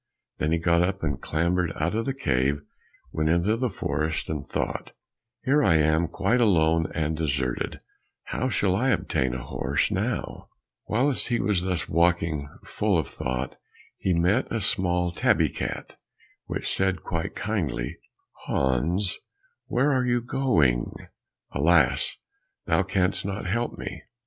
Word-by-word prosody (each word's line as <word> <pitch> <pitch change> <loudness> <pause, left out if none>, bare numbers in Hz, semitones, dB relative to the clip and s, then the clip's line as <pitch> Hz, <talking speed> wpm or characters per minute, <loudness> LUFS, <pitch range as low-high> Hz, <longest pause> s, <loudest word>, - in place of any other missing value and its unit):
Then 75 - 0
he 85 - +3
got 85 0 +3
up 95 +1 0
and 70 -4 -1
clambered 85 +2 0
out 85 +5 -1
of 115 +1 -1
the 135 - 0
cave, 70 - +1 0.5
went 80 0 0
into 85 +6 +3
the 125 +1 0
forest, 80 -5 -2
and 75 -2 -3
thought, - - -3 0.5
"Here 145 +3 +3
I 80 - +4
am 80 +2 +3
quite 100 +9 +1
alone 80 -6 +3
and 80 0 0
deserted, 70 -5 -2 0.4
how 130 - -2
shall 95 -6 +1
I 130 +7 +2
obtain 65 - 0
a 60 - -5
horse - - -1
now?" - - -2 0.4
Whilst 130 +5 +1
he 120 - +1
was 100 -4 +1
thus 90 -2 -1
walking 85 -3 +1
full 105 -3 0
of 80 - 0
thought, 65 +1 -3 0.4
he 95 - -1
met 95 +9 +2
a 115 - 0
small 90 -3 +1
tabby - - +2
cat - - -5 0.5
which - - -2
said 95 -1 0
quite 80 -2 -3
kindly, 95 - -2 0.5
"Hans, 80 +9 +1 0.5
where 135 +4 +2
are 130 -2 +2
you 120 -1 +2
going?" 100 - +1 0.6
"Alas, 75 -1 +3 0.5
thou - - +3
canst 95 -1 0
not 100 +1 -4
help 120 +6 -1
me." - - -6
85 Hz, 145 wpm, -26 LUFS, 80-105 Hz, 0.6 s, I